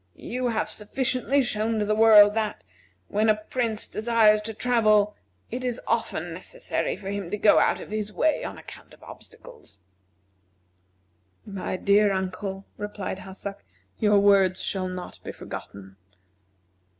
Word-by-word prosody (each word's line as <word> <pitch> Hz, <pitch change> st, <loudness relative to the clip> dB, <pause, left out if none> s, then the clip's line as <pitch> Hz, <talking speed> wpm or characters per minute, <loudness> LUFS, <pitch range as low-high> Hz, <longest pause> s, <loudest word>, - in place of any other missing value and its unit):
You 250 Hz, +1 st, -3 dB
have 225 Hz, -2 st, -1 dB
sufficiently 260 Hz, +4 st, 0 dB
shown 225 Hz, -1 st, -1 dB
to 210 Hz, -, 0 dB
the 215 Hz, -, +1 dB
world 215 Hz, -1 st, +7 dB
that, 215 Hz, -1 st, -2 dB, 0.4 s
when 215 Hz, +2 st, +1 dB
a 215 Hz, -, +5 dB
Prince 220 Hz, 0 st, -3 dB
desires 215 Hz, -1 st, +3 dB
to 220 Hz, +1 st, -5 dB
travel, 215 Hz, -4 st, +2 dB, 0.4 s
it 250 Hz, +2 st, -4 dB
is 250 Hz, -1 st, -2 dB
often -, -, -2 dB
necessary -, -, -3 dB
for 195 Hz, -1 st, -6 dB
him 200 Hz, -4 st, -4 dB
to 210 Hz, -, -2 dB
go 210 Hz, -, +5 dB
out -, -, +2 dB
of -, -, -10 dB
his 215 Hz, -1 st, -3 dB
way 310 Hz, +7 st, +1 dB
on -, -, -6 dB
account -, -, -13 dB
of -, -, -22 dB
obstacles." -, -, -13 dB, 1.7 s
"My 195 Hz, -2 st, -4 dB
dear 205 Hz, +2 st, +3 dB
uncle," 190 Hz, +1 st, -4 dB
replied 205 Hz, -2 st, -5 dB
Hassak, 195 Hz, +1 st, -8 dB, 0.4 s
"your 210 Hz, -1 st, +4 dB
words 195 Hz, -2 st, +4 dB
shall 185 Hz, -2 st, -2 dB
not 185 Hz, -1 st, -7 dB
be -, -, -6 dB
forgotten." 95 Hz, -1 st, -10 dB
210 Hz, 145 wpm, -25 LUFS, 200-225 Hz, 1.7 s, world